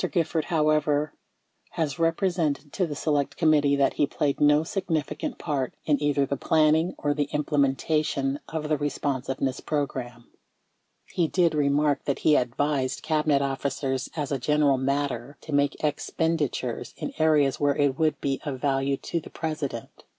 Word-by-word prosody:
Gifford, 165 -3 0
however, 150 -2 +1 0.6
has 160 0 -2
represented 165 -3 0
to 185 -3 0
the 150 - -5
Select 145 -1 -1
Committee 150 -3 +4
that 140 -1 +2
he 145 - +1
played 140 -1 -1
no 150 +1 +5
significant 160 -4 -3
part 140 -5 -2
in 150 -2 +2
either 145 -1 +2
the 140 - -2
planning 160 +4 +2
or 145 0 0
the 145 -1 -1
imple 150 0 0
mentation 140 0 +1
of 160 -1 -4
the 150 -2 0
Responsiveness 135 -2 -2
Program. 130 -5 -3 0.9
He 170 -3 +2
did 170 -1 +2
remark 145 -1 +1
that 140 - 0
he 155 - +6
advised 130 +2 0
Cabinet 150 -3 +2
officers 135 0 -2
as 150 -3 -3
a 140 - 0
general 145 0 +2
matter 140 -1 -2
to 155 - -7
make 145 +1 +1
expenditures 155 0 -1
in - - -5
areas 150 -4 +3
where 145 -1 +2
it 145 -2 +1
would 155 -2 +1
be 135 -1 -2
of 135 -3 -4
value 135 0 0
to 170 - -3
the - - -11
President. 150 -7 -5
145 Hz, 155 wpm, -26 LUFS, 140-155 Hz, 0.9 s, he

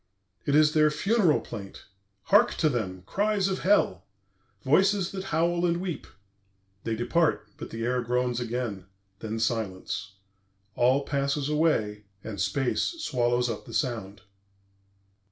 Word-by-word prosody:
"It 140 - +3
is 150 0 +5
their 155 -1 +5
funeral 180 +2 +2
plaint. 100 -3 -9 0.4
Hark 210 +4 +4
to 155 - +2
them! 95 -8 -3
Cries 205 - +1
of 190 -1 -1
Hell! 165 - +2 0.6
Voices 190 +6 +3
that 190 -1 -5
howl 170 0 +1
and 170 -1 +2
weep! 180 -4 -4 0.8
"They 115 - -1
depart,... 120 -1 +1
but - - -7
the 115 0 -5
air 125 +1 +1
groans 125 0 0
again. 115 -5 -3 0.3
Then 110 0 -4
silence. 105 -3 -2 0.6
"All 130 +3 +3
passes 140 0 -1
away, 110 -10 +1 0.2
and 100 -4 -5
space 125 +7 0 0.2
swallows 125 - +1
up 115 -3 -5
the - - -7
sound." 110 -7 -2
130 Hz, 135 wpm, -27 LUFS, 110-170 Hz, 0.8 s, is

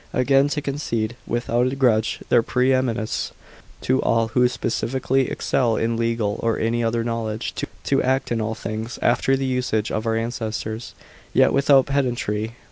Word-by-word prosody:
Again, 135 +2 +3
to 150 0 -2
concede, 120 -6 -2
without 120 +1 0
a - - -3
grudge, 115 -5 +2
their - - +5
pre 125 +3 +1
eminence 120 -4 -1 0.5
to 130 +1 +1
all 115 0 +1
who 125 +2 +3
specially 130 +2 -1
excel 120 -4 0
in 115 +1 0
legal 115 -2 -1
or 115 -1 +1
any 115 +1 0
other 115 0 0
knowledge, 115 -2 -3 0.3
to 135 - +2
act 130 0 0
in 115 -1 0
all 110 +1 -2
things 110 +2 -5
after 135 0 +3
the 135 - -2
usage 125 -4 -1
of 110 +1 -2
our 115 - +1
ancestors, 115 -1 -4 0.4
yet - - +5
without 140 -1 +5
pedantry 120 -5 -1
120 Hz, 160 wpm, -22 LUFS, 115-130 Hz, 0.5 s, their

